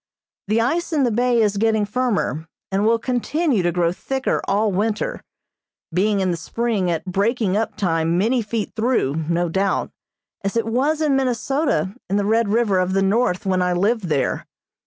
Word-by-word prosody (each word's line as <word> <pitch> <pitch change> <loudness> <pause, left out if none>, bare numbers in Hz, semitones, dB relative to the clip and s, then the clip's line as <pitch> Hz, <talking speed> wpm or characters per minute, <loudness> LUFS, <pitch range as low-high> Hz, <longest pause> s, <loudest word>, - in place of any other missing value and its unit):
The 215 +3 +2
ice 335 +10 0
in 300 -4 +2
the 245 - +2
bay 240 0 +2
is 205 -1 +1
getting 220 0 +2
firmer, 205 -8 -1 0.2
and 195 +1 +1
will 230 +1 +4
continue 255 - 0
to 175 0 +1
grow 170 -1 +1
thicker 265 +8 -2
all 210 +1 +2
winter, 210 +3 -1 0.7
being 200 +3 +2
in 185 -1 +1
the 170 - -2
spring 215 +2 -1
at 165 0 -2
breaking 200 +2 0
up 220 -1 -1
time 165 -4 +1
many 235 +6 +2
feet 215 0 -3
through, 220 - +1
no 175 +1 +1
doubt, 190 +3 0 0.5
as 195 +3 -1
it 230 - +1
was 275 +7 0
in 295 -3 +2
Minnesota 255 - 0
in 195 - 0
the 205 0 +1
Red 225 0 +2
River 210 -3 +2
of 185 +1 0
the 195 0 +2
North 195 -2 +1
when 185 -1 +1
I 180 0 +1
lived 205 +4 +1
there. 150 -5 -1
210 Hz, 180 wpm, -21 LUFS, 185-240 Hz, 0.7 s, will